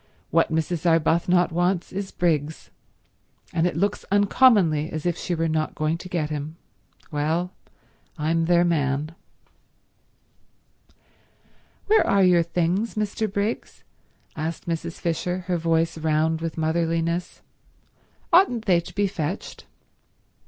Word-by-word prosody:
What - - +3
Mrs. 160 +1 -1
Arbuthnot 170 +2 +2
wants 175 +2 0
is 195 0 -4
Briggs, 160 -3 -1 0.8
and 170 +1 +2
it 175 - -3
looks 200 +4 0
uncommonly 200 - +4
as 155 0 -5
if 175 -2 +1
she 175 0 -3
were 165 0 0
not 155 -1 -1
going 155 +2 -1
to 185 - -9
get 155 -4 -2
him. 150 +1 -4 0.6
Well, 160 +4 -1 0.7
I'm 165 +2 0
their 175 +1 +4
man." 150 -2 0 2.7
"Where 435 +1 +4
are 200 -1 +4
your 180 -2 +5
things, 175 +6 -1
Mr. 215 0 -2
Briggs?" 205 +3 -3 0.5
asked 160 +2 -4
Mrs. 170 0 -3
Fisher, 180 +2 -2
her 180 -1 -1
voice 165 0 0
round 160 +1 +1
with 165 0 -4
motherliness. 165 +2 -1 0.9
"Oughtn't 250 - +4
they 180 -4 +4
to 170 - -10
be 205 - +2
fetched?" 180 -1 -5
170 Hz, 125 wpm, -24 LUFS, 160-180 Hz, 2.7 s, your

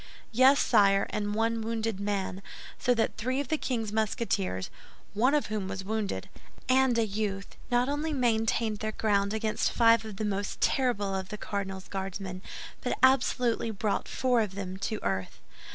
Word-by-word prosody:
"Yes, 260 +4 +6
sire, 200 -3 +4
and 205 0 -2
one 225 +1 +1
wounded 225 -2 -2
man; 200 -2 -2 0.4
so 245 -1 +2
that 225 - 0
three 255 +4 -1
of 285 -3 -3
the 315 - +1
king's 225 -5 -2
Musketeers—one 215 - -1
of 295 - +1
whom 210 -3 -3
was 190 0 -5
wounded—and 235 +4 -1
a 230 - +3
youth 200 -1 -3
not 245 +1 +2
only 295 +3 -1
maintained 225 -4 +1
their 215 0 -3
ground 200 -2 +1
against 220 0 0
five 230 -1 +5
of 215 -2 -7
the 215 - -2
most 200 -1 -2
terrible 205 -7 +1
of 190 -1 -3
the 210 - -5
cardinal's 195 -2 -4
Guardsmen, 190 -1 -5 0.4
but - - -1
absolutely 250 -3 +3
brought 215 -1 -1
four 250 -3 +2
of 200 -3 -3
them 190 -1 -5
to 205 +3 -2
earth." 95 -1 -2
215 Hz, 160 wpm, -29 LUFS, 195-235 Hz, 0.4 s, Yes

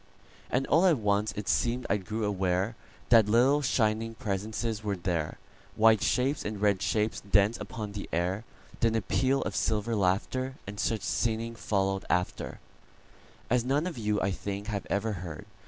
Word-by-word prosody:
And 130 +2 +1
all 170 +5 +4
at 165 -5 +4
once 105 -1 +1
it 105 -1 -6
seem'd 120 +1 +1
I 100 - +2
grew 105 +3 -4
awareThat 100 +4 +1
little, 130 +6 +4
shining 115 -3 +1
presences 110 0 -3
were 105 -2 -1
there,—White 90 +5 0
shapes 135 +3 +1
and 105 -1 -4
red 100 -2 +2
shapes 110 0 0
danced 100 +2 +2
upon 105 0 -5
the 100 0 -6
air; 90 +5 0 0.4
Then 115 -1 +2
a 110 - 0
peal 135 +7 +1
of - - -4
silver 110 +1 0
laughter, 110 +7 0
And 100 +1 -7
such 110 -2 0
singing 115 0 -1
followed 95 -3 -1
afterAs 90 +6 -4
none 140 +5 +1
of 175 -9 -4
you, 105 -1 0
I 100 - +1
think, 100 +1 -4
have 100 -2 -3
ever 105 +3 0
heard. 90 0 -7
105 Hz, 155 wpm, -29 LUFS, 100-115 Hz, 0.4 s, all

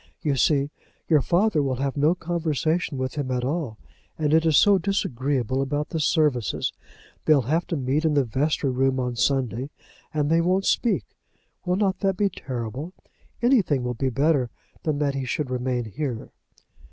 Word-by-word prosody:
You 145 -3 +1
see, 140 +2 +2 0.4
your 155 -3 +4
father 175 +1 +2
will 135 -2 0
have 135 +1 -2
no 150 +4 +3
conversation 165 -2 -1
with 130 0 -2
him 145 -3 -3
at 125 -1 -1
all, 140 -6 -2 0.4
and 150 -1 +1
it 160 +1 +4
is 155 - +5
so 200 -2 +6
disagreeable 135 - -1
about 145 +2 -2
the 165 - -2
services. 150 - +1 0.5
They'll 150 -4 +5
have 160 +8 0
to 170 - -2
meet 135 +4 0
in 155 -2 +2
the 140 - +4
vestry 135 +3 0
room 130 +1 +1
on 125 -1 -2
Sunday, 125 0 0 0.4
and 150 -2 0
they 165 +1 +4
won't 185 +3 +1
speak. 235 - +2 0.6
Will 180 - +2
not 195 -1 +1
that 195 -2 0
be 205 -1 +2
terrible? 130 - -6 0.5
Anything 200 - +3
will 125 0 -1
be 130 +3 -1
better 135 0 +2 0.3
than 155 -2 -1
that 145 -1 0
he 135 -1 -3
should 130 +1 -2
remain 125 -1 -1
here." 125 +1 -4
145 Hz, 175 wpm, -24 LUFS, 130-165 Hz, 0.6 s, so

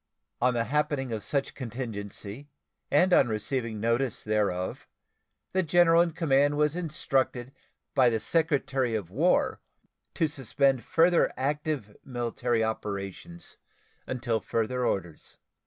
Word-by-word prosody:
On 125 0 +3
the 115 - +1
happening 140 -1 -1
of 110 -3 -3
such 140 +5 -1
contingency, 115 0 -6 0.4
and 185 0 +4
on 135 - +6
receiving 110 0 -2
notice 115 +2 0
thereof, 100 -4 -1 0.6
the 190 - +2
general 170 0 +5
in 175 - +2
command 145 -3 +2
was 150 +1 +2
instructed 135 -6 -1 0.4
by 130 -2 +5
the 115 -1 0
Secretary 135 -4 +1
of 95 -5 -4
War 160 - +2 0.5
to 165 - +2
suspend 135 -2 +1
further 170 0 +3
active 145 -5 -2
military 120 -2 -1
operations 100 -5 -4 0.5
until 120 -3 -1
further 120 +4 -1
orders. 85 -5 -4
125 Hz, 120 wpm, -28 LUFS, 110-150 Hz, 0.6 s, on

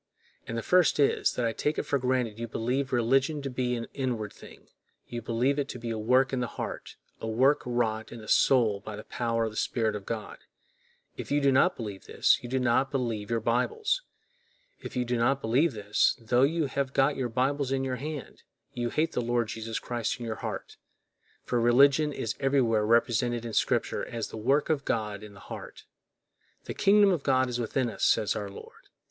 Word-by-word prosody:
And 115 - -4
the 115 - -3
first 180 -4 +3
is, 140 - +3
that 125 - -1
I 115 - 0
take 150 +6 -1
it - - 0
for 140 - 0
granted 125 -4 -1
you 115 - -3
believe 125 +5 -2
religion 135 +5 +2
to 135 - -4
be 125 -1 -1
an 115 -1 -4
inward 120 -6 -3
thing; - - -15 0.4
you 120 -1 -5
believe 125 +5 0
it 140 - -2
to - - -5
be 115 -1 -5
a 110 - -3
work 130 +5 +3
in 130 - 0
the 125 - -1
heart, - - -6 0.2
a 110 - -5
work 130 +6 +3
wrought 110 -2 -1
in 120 - -8
the 110 - -11
soul 115 -7 +3
by 105 0 -8
the 105 - -8
power 115 -1 -1
of 110 - -2
the - - -13
Spirit 110 -3 0
of 100 -2 -7
God. 110 -2 -5 0.8
If - - -6
you 145 - +2
do 140 -1 +3
not 140 +7 +3
believe 105 -5 -7
this, - - +3
you 120 - -8
do 130 - 0
not 125 +2 +2
believe 115 -6 -2
your 115 -1 0
Bibles. 275 - 0 0.8
If - - -8
you 125 -1 0
do 120 0 -1
not 135 +4 +2
believe 135 +6 +2
this, 105 -1 +1
tho 120 +2 +1
you 155 +3 +2
have 135 0 -2
got 140 +1 +3
your 130 -2 -2
Bibles 135 +3 0
in 135 0 0
your 130 -1 -2
hand, 145 -3 -7 0.3
you 120 -1 -2
hate 155 +6 0
the - - -1
Lord 120 -1 0
Jesus 115 0 -4
Christ 120 0 -3
in 120 - -5
your 110 -1 -4
heart; - - -6 0.7
for 120 -1 0
religion 140 +5 +5
is 115 -5 -3
everywhere 120 -6 +2
represented 120 +1 +2
in 115 - -5
Scripture - - 0
as 115 -2 -4
the - - -8
work 135 +7 +2
of 145 -3 0
God 105 -5 -2
in 105 -1 -11
the - - -13
heart. - - -9 0.8
"The - - -5
kingdom 205 0 +5
of 175 -5 0
God 130 -2 +2
is 120 0 -3
within 120 +2 0
us," 115 - -5
says 105 - +3
our 100 -1 -4
Lord! 100 - -13
120 Hz, 210 wpm, -28 LUFS, 115-135 Hz, 0.8 s, religion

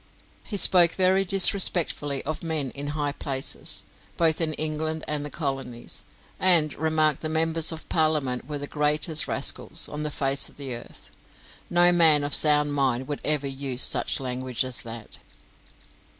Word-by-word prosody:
He 205 - -6
spoke 175 -3 +4
very 190 +1 +1
disrespectfully 175 -7 +3
of 155 - -5
men 155 -6 -4
in 140 +1 -8
high 145 -1 -2
places, 135 -2 -3 0.3
both 165 -1 +1
in 155 -2 -2
England 155 +1 -4
and 150 -1 -4
the 145 - -7
Colonies; 135 -5 -7 0.4
and 170 -5 +2
remarked 155 -1 -1
that 155 - -5
Members 160 +1 +1
of 160 0 -9
Parliament 155 -6 -2
were 150 -1 -5
the 145 - -7
greatest 150 +2 +3
rascals - - 0
on 150 - -7
the 150 - -4
face 135 -1 -1
of - - -24
the 135 -3 -5
earth. 120 - -11 0.6
No 175 0 +3
man 160 -4 +4
of 145 0 -3
sound 150 -1 +4
mind 130 -2 -2
would 145 -1 -6
ever 150 -2 0
use 135 -2 -1
such - - 0
language 130 -1 -4
as 130 -1 -6
that. 115 -1 -10
150 Hz, 160 wpm, -23 LUFS, 135-160 Hz, 0.6 s, spoke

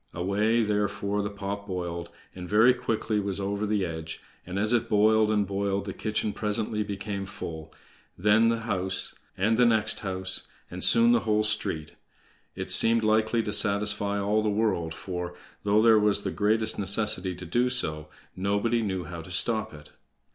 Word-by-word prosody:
Away, 105 +6 +1
therefore, 105 -1 -1
the 100 - -3
pot 100 0 -6
boiled, 85 -2 -4 0.2
and 90 -1 -8
very 110 +4 +5
quickly 115 -3 -2
was 100 -1 -3
over 100 +2 -2
the 105 -2 0
edge; 80 -1 -6 0.3
and 90 +1 -5
as 105 +4 +2
it 120 - +1
boiled 110 0 +4
and 105 -2 +1
boiled 100 0 -2
the 95 - -5
kitchen 110 +1 -2
presently 105 0 -2
became 100 -1 -4
full, 80 -6 -8 0.5
then 105 +4 +4
the 115 0 -1
house, 95 -4 -1 0.2
and 110 +4 +1
the 125 - +5
next 110 -2 +2
house, 95 -2 -2 0.2
and 90 +1 -6
soon 235 0 +5
the 240 - +4
whole 105 - +1
street. 95 -8 -1 0.6
It - - -3
seemed 115 0 +5
likely 110 +1 +2
to 105 - -3
satisfy 100 -1 +2
all 105 +2 +1
the 105 - 0
world, 100 -7 -1
for, 90 -1 -6 0.3
though 105 +1 +2
there 110 -2 +6
was 105 -1 +2
the - - -2
greatest 110 +1 0
necessity 95 -2 0
to 90 +1 -9
do 120 +9 +1
so, 75 -12 -2 0.3
nobody 100 +5 0
knew 95 -4 -2
how 85 +1 -7
to 80 - -12
stop 110 +4 0
it. 75 -1 -14
105 Hz, 175 wpm, -27 LUFS, 95-110 Hz, 0.6 s, there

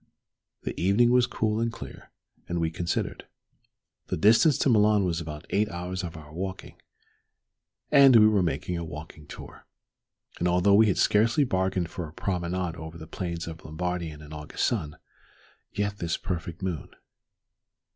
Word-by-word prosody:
The - - -3
evening 105 +7 +4
was 125 0 +4
cool 110 -2 -1
and 115 0 0
clear, - - -10 0.4
and 85 - -1
we 80 -1 0
considered. 85 +1 -3 0.8
The - - -2
distance 115 - +5
to - - +2
Milan 105 -3 +4
was 85 -2 -1
but 75 -2 -7
eight 105 +1 +2
hours 90 +1 -4
of 85 -2 -6
our 75 -1 -12
walking, 95 +2 -6 1.1
and 140 -3 +8
we 110 -1 +8
were 105 -3 +3
making 85 +1 -2
a - - -4
walking 80 -1 -9
tour. - - -11 0.7
And 85 - +1
although 90 +3 +3
we 110 +2 +6
had 95 - +1
scarcely 115 +7 +3
bargained 95 -6 -1
for 90 -5 -5
a - - -17
promenade 90 -1 -2
over 80 0 -8
the 80 - -9
plains 85 0 -4
of 80 0 -8
Lombardy 90 +1 -3
in 75 0 -11
an 75 +1 -11
August 75 0 -3
sun 75 -2 -2 0.7
yet 100 0 -2
this 85 -1 -1
perfect 85 -1 -5
moon? 85 -8 -3
90 Hz, 165 wpm, -27 LUFS, 80-105 Hz, 1.1 s, and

